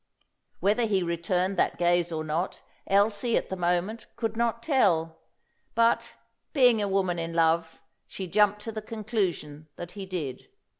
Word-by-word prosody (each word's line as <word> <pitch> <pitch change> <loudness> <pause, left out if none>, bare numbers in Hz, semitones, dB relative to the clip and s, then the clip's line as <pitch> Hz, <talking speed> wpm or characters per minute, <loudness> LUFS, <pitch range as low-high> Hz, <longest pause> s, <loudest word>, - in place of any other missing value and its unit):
Whether 215 +4 +2
he 195 -3 +1
returned 180 +2 -1
that - - +1
gaze 175 0 +2
or 160 -1 -2
not, 160 +4 -3 0.2
Elsie, 205 +3 +2
at - - -2
the 190 - -2
moment, 180 +5 -1
could 225 -2 -2
not 235 0 0
tell. 165 - +2 0.6
But, 230 0 +2 0.4
being 245 -6 +5
a 205 - 0
woman 190 -3 0
in 165 0 -3
love, 165 0 +2 0.3
she 190 - -6
jumped 210 +3 +2
to 225 - -4
the 215 0 -5
conclusion 200 -9 -3
that 175 +2 -7
he 195 -2 -7
did. 155 -9 -5
190 Hz, 155 wpm, -27 LUFS, 170-215 Hz, 0.6 s, being